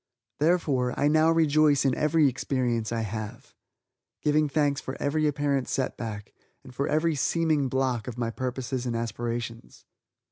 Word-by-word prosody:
Therefore, 145 -6 +1
I 145 - +3
now 155 +2 +4
rejoice 155 -3 +3
in 135 - +3
every 150 +2 +3
experience 120 -3 -1
I 115 -1 -1
have 110 0 -6 0.7
giving 150 0 +2
thanks 145 -1 +1
for 130 - -6
every 155 +2 +1
apparent 140 -2 0
set 130 - -1
back, 105 -3 -6 0.3
and 125 - -13
for 140 +3 -1
every 155 +2 +1
"seeming" 155 -1 +1
blocking 130 -3 -1
of 120 - -13
my 115 -1 -1
purposes 130 +1 -3
and 120 - -2
aspirations. 115 +1 -5
135 Hz, 150 wpm, -27 LUFS, 120-150 Hz, 0.7 s, now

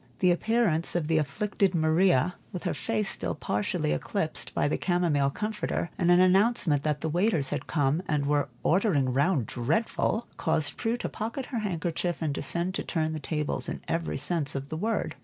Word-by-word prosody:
The 180 -1 +4
appearance 180 -4 +1
of 165 -3 0
the 160 -1 +3
afflicted 195 +5 0
Maria, 165 0 +3 0.2
with 180 - -6
her - - -1
face 215 -3 -1
still 85 - -3
partially 100 -6 -1
eclipsed 75 - -2
by - - +2
the 145 - -1
chamomile 170 -6 +2
comforter, 210 -2 -3
and 175 - +1
an 175 0 +6
announcement 185 - +4
that 150 -1 -1
the - - -1
waiters 170 -3 +1
had - - -3
come 145 +1 +1
and 150 -2 0
were 145 -1 +1
"ordering 160 - +2
round 140 - +2
dreadful," 165 - 0
caused 160 -2 0
Prue 230 +2 -1
to - - -3
pocket 230 +4 -4
her 235 - 0
handkerchief 175 -3 -2
and 155 -3 -1
descend 170 +6 -1
to - - -2
turn 160 -2 -1
the 155 - -3
tables 150 0 -2
in - - -5
every 165 0 -1
sense 155 -6 -1
of 135 +1 -4
the 155 - -4
word. 220 +5 -1
165 Hz, 185 wpm, -28 LUFS, 145-190 Hz, 0.2 s, an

